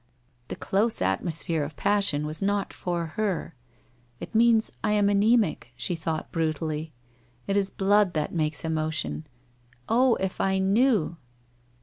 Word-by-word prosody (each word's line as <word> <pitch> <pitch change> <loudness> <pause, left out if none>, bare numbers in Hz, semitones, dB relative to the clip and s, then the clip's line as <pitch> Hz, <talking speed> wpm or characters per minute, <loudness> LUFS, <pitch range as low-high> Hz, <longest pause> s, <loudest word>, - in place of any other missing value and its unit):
The - - -5
close 215 +4 0
atmosphere 165 -2 0
of 145 +1 -6
passion 200 -6 +1
was 155 +1 -4
not 200 0 0
for 175 -2 -2
her. 205 -6 -1 0.7
'Jt - - -8
means 225 0 +4
I 210 - +2
am, 205 -1 +3
ana?mic!' 205 - +2
she 125 +8 -2
thought 160 -1 -3
brutally. 155 -1 -2 0.3
* 120 0 -35
It 195 - 0
is 200 -1 +2
blood 200 -1 +2
that 155 -1 -1
makes 155 -2 -1
emotion. 155 -1 -2 0.6
Oh, 245 +1 +4
if 190 -1 -3
I 190 0 +1
knew?' 195 -3 +2
180 Hz, 140 wpm, -26 LUFS, 155-205 Hz, 0.7 s, means